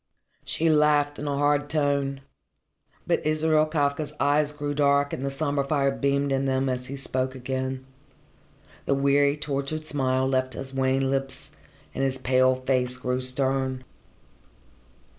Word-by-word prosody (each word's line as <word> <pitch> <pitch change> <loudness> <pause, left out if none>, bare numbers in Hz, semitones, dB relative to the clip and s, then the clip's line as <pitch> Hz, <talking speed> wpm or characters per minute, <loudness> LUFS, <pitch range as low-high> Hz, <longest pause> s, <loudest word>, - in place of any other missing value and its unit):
She 165 - 0
laughed 150 -2 +3
in 150 - -4
a 140 -1 -1
hard 145 0 +1
tone. 140 -2 0 0.8
But - - 0
Israel 155 0 +2
Kafka's 150 -1 -1
eyes 145 +1 +2
grew 145 -1 -4
dark 140 0 +2
and 130 - -4
the 140 - -1
sombre 140 0 -1
fire 140 -1 +1
beamed 140 0 0
in 135 0 +1
them 130 0 0
as 125 0 -3
he 140 - -6
spoke 130 -1 -2
again. 130 0 -4 1.0
The 140 - +3
weary, 140 +1 +3
tortured 150 +1 -3
smile 130 -3 0
left 130 -1 0
his 135 0 -6
wan 135 0 +1
lips, 135 0 -3 0.4
and 135 - -2
his 135 -1 +1
pale 130 0 +3
face 130 -1 0
grew 125 0 -2
stern. 130 0 -1
140 Hz, 145 wpm, -25 LUFS, 130-145 Hz, 1.0 s, laughed